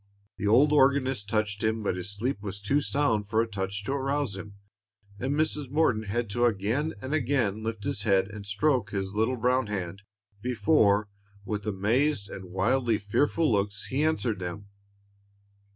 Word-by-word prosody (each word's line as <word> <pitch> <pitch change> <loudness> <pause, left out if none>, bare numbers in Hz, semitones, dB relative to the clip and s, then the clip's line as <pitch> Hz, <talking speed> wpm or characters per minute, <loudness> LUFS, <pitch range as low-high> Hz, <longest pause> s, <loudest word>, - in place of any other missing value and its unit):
The 105 - -2
old 135 +8 +5
organist 135 -6 +3
touched 105 -1 0
him; 110 0 0
but 100 - 0
his 90 +2 -4
sleep 105 +3 -2
was 100 -1 -5
too 135 +9 +1
sound 115 -8 0
for 110 +1 +2
a 115 - +2
touch 100 -1 -4
to 115 - -3
arouse 140 -4 -1
him, 100 +1 -9 0.6
and 135 +3 -1
Mrs. 150 -3 0
Morton 130 -7 +2
had 115 +4 -1
to 120 +3 +2
again 115 +8 0
and 130 +3 -3
again 120 -7 +1
lift 110 -1 -4
his 100 - -2
head 95 -2 +3
and 105 0 -8
stroke 110 +2 +1
his 95 -1 -3
little 110 +4 +1
brown 125 +1 +2
hand, 95 -2 -4 0.4
before, 110 -4 +3 0.4
with 105 -2 -4
amazed 105 +4 +1
and 95 - -7
widely 110 +6 +1
fearful 145 +9 +1
looks, 100 -1 0
he 135 +3 +1
answered 130 -10 0
them. 95 +3 -6
110 Hz, 170 wpm, -28 LUFS, 100-130 Hz, 0.6 s, old